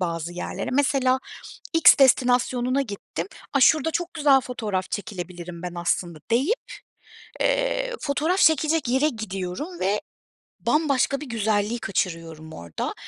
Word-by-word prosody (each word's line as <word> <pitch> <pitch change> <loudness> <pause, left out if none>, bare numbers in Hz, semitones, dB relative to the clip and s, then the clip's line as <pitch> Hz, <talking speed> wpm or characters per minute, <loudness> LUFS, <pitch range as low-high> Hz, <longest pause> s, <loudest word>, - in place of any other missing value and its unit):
bazı 170 -1 -3
yerlere. 175 - -4
Mesela 265 -1 +2 0.6
X 325 -1 +8
destinasyonuna 255 0 +3
gittim, 200 -7 -6 0.3
"A, 275 - +3
şurada 310 +3 +4
çok 350 +2 -3
güzel 285 -4 +4
fotoğraf 215 -7 -4
çekilebilirim 175 -4 -6
ben 180 -1 -5
aslında." 170 -1 -2
deyip, 270 - +3 0.9
eee, - - 0
fotoğraf 310 +5 0
çekecek 315 -3 +3
yere 265 +5 +3
gidiyorum 220 - -5
ve 200 +2 +1 0.6
bambaşka 275 -3 +1
bir - - -6
güzelliği 220 0 0
kaçırıyorum 165 -6 -3
orada. 85 -1 -5
245 Hz, 120 wpm, -24 LUFS, 185-290 Hz, 0.9 s, X